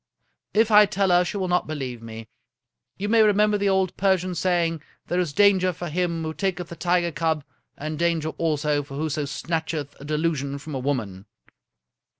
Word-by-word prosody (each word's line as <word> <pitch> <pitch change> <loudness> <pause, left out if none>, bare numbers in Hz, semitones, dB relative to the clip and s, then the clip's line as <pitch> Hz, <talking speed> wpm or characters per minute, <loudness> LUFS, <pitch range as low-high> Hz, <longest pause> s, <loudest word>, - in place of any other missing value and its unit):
" - - -53
If 225 0 0
I 210 0 +8
tell 195 0 0
her 175 0 +5
she 180 - -4
will 190 -2 -1
not 180 0 +1
believe 130 -6 -5
me. 115 0 -9 0.7
You 200 - -3
may 225 +1 +4
re 210 -1 +5
member 210 0 +2
the 200 0 +2
old 190 -2 +1
Persian 185 -2 +1
saying, 170 -3 0
' - - -38
There 175 - 0
is 175 -5 0
danger 190 +2 +4
for 175 0 -6
him 170 0 -1
who 160 0 -3
taketh 180 -2 -2
the 170 - -7
tiger 175 0 +1
cub, 160 -1 -1 0.3
and 155 +1 -5
danger 165 -2 +1
also 150 -2 +1
for 140 -1 -9
whoso 155 -1 -1
snatch 160 +3 -3
eth 145 -2 -5
a - - -10
delusion 150 -2 -1
from 150 +2 -8
a 135 - -2
woman.' 110 -8 -3
165 Hz, 200 wpm, -24 LUFS, 150-185 Hz, 0.7 s, I